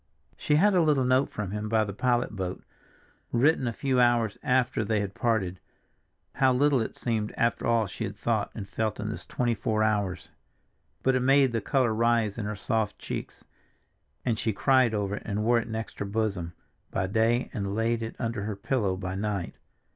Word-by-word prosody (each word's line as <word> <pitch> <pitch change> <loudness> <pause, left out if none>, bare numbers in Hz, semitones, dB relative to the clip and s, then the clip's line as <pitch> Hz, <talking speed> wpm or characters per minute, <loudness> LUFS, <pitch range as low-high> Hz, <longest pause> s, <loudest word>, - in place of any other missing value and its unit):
She 150 - +1
had 200 +7 +4
a 180 - +4
little 150 -4 +3
note 130 +2 +3
from 105 -3 -5
him 105 +1 -3
by 110 -1 +3
the 100 -1 -5
pilot 120 +2 +1
boat, 95 -2 -4 0.7
written 130 +2 +3
a - - 0
few 130 +2 0
hours 120 -3 +3
after 125 -4 +1
they 105 0 0
had 100 -1 -3
parted; 100 -7 0 0.7
how 130 -1 +3
little 135 0 +3
it 110 - -4
seemed 110 -3 -2
after 115 0 +1
all 115 -2 +3
she 95 - -5
had - - -6
thought - - 0
and 100 - -6
felt 105 +2 -2
in 105 +1 -3
this 110 - -7
twenty 120 -1 0
four 110 0 0
hours! 100 -6 -1 0.7
But 130 - +3
it 130 - +2
made 135 0 +4
the 115 -1 -1
color 125 +2 +1
rise 115 -1 +1
in 105 - -3
her 105 +1 -3
soft 105 +1 -1
cheeks, - - -6 0.8
and 115 -3 0
she 110 - 0
cried 130 +1 +3
over 100 0 -1
it - - -8
and 105 +1 -2
wore 120 +1 +4
it 115 - -6
next 110 0 -5
her - - -2
bosom 100 -5 -2 0.4
by 100 - -1
day 115 +5 +1
and 100 -3 -3
laid 115 +1 0
it 115 - -5
under 115 -3 -2
her 105 -1 -3
pillow 100 -3 -1
by 90 0 -4
night. 100 -2 -2
110 Hz, 200 wpm, -27 LUFS, 105-125 Hz, 0.8 s, had